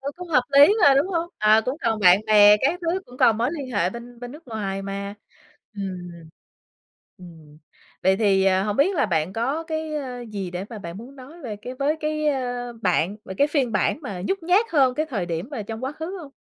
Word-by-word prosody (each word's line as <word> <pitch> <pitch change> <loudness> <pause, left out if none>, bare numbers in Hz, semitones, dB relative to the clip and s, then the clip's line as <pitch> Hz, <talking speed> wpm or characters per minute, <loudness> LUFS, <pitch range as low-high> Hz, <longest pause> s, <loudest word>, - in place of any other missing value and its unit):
Ừ, 275 +1 -4
cũng 360 0 -9
hợp 255 -6 +3 0.2
lý 290 +8 +8
mà, 280 -1 +7
đúng 280 +5 +3
hông? 340 -2 -2
Ờ, 215 +1 +5
cũng 255 +4 -2
còn 225 -2 0
bạn 185 +1 +6
bè 210 -1 +7
các 285 +11 0
thứ, 345 +2 -1
cũng 245 - -14
còn 230 -4 +4
mối 240 +3 +1
liên 280 -6 -6
hệ 180 -6 0
bên 235 +2 -11
bên 245 +1 -8
nước 300 -3 -14
ngoài 195 -3 -4
mà. 200 +1 -5 0.6
Ừm. 185 -3 -6 1.1
Ừm, 160 -4 -15 0.4
vậy 190 +1 +3
thì, 195 -2 +2
ờ, 190 0 +3
hông 210 0 -2
biết 370 +8 +3
là 280 - +2
bạn 170 -1 -1
có 265 +9 -2
cái 315 -1 -4 0.4
gì 195 -3 -4
để 180 +2 -5
mà 225 - -7
bạn 170 0 -8
muốn 255 +5 -12
nói 285 +6 -13
về 220 -5 -5
cái 250 +5 -8
với 285 +4 0
cái 305 0 -2 0.6
bạn 180 +1 +1
về 190 - -7
cái 285 - +4
phiên 275 -6 0
bản 205 - +1
mà 195 -9 -6
nhút 390 - 0
nhát 370 +7 +3
hơn 265 -4 +3
cái 310 +1 -1
thời 210 - -3
điểm 170 +6 -4
mà 250 -8 -4
trong 225 +4 -6
quá 265 - -3
khứ 320 +6 -6
hông? 280 - -11
235 Hz, 225 wpm, -23 LUFS, 195-290 Hz, 1.1 s, lý